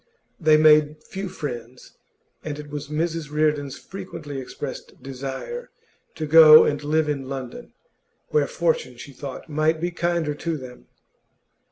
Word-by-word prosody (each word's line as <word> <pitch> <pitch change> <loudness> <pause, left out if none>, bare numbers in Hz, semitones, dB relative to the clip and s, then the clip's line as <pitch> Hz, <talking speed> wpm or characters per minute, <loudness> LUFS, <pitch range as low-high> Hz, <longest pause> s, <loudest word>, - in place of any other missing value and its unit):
They 155 -2 +5
made 155 0 +4
few 195 0 -6
friends, 125 -8 -7 0.5
and 150 -2 -5
it 150 -1 -9
was 145 -1 -5
Mrs 160 +1 -2
Reardon's 150 -2 0
frequently 165 -7 -8
expressed 130 +1 -8
desire 135 - -6 0.5
to 155 - -3
go 155 0 +9
and 145 0 -1
live 155 +1 +1
in 140 -3 -3
London, 130 -3 -7 0.6
where 145 -2 +2
fortune, 160 -7 -1
she 140 +3 -10
thought, 135 +3 -8
might 155 +1 +1
be 175 +2 -2
kinder 170 -3 -1
to 165 +2 -3
them. 125 -2 -12
150 Hz, 140 wpm, -23 LUFS, 140-160 Hz, 0.6 s, go